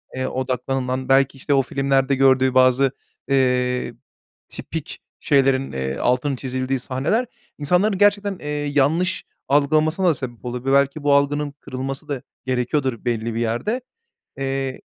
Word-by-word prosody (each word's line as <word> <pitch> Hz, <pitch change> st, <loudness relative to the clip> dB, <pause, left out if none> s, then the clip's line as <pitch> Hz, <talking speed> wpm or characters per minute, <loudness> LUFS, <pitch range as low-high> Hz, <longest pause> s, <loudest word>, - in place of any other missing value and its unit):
eee, 130 Hz, 0 st, -2 dB
odaklanılan, 130 Hz, 0 st, -2 dB
belki 135 Hz, 0 st, +3 dB
işte 145 Hz, +2 st, -1 dB
o 135 Hz, -, +4 dB
filmlerde 135 Hz, 0 st, +1 dB
gördüğü 130 Hz, -1 st, +4 dB
bazı, 130 Hz, +1 st, +4 dB, 0.4 s
eee, 125 Hz, -2 st, +1 dB, 0.6 s
tipik -, -, -6 dB, 0.2 s
şeylerin, 135 Hz, -1 st, +2 dB
eee, 65 Hz, 0 st, -3 dB
altının 125 Hz, +3 st, +1 dB
çizildiği 130 Hz, +1 st, -2 dB
sahneler 140 Hz, -, -1 dB, 0.3 s
insanların 180 Hz, +7 st, +1 dB
gerçekten, 205 Hz, -1 st, +2 dB
eee, 150 Hz, -, -8 dB
yanlış 150 Hz, +5 st, 0 dB, 0.2 s
algılamasına 155 Hz, +6 st, +2 dB
da -, -, +4 dB
sebep 125 Hz, -4 st, -7 dB
olabiliyor 125 Hz, +2 st, -1 dB
ve -, -, +8 dB
belki 140 Hz, +2 st, -2 dB
bu 145 Hz, -1 st, +3 dB
algının 145 Hz, +1 st, +1 dB
kırılması 135 Hz, +1 st, -6 dB
da 140 Hz, -3 st, -3 dB, 0.2 s
gerekiyordur 130 Hz, -1 st, -1 dB
belli 115 Hz, -1 st, -1 dB
bir -, -, -1 dB
yerde. 120 Hz, -, -1 dB, 0.6 s
Eee 135 Hz, -1 st, -3 dB
135 Hz, 135 wpm, -22 LUFS, 130-145 Hz, 0.6 s, ve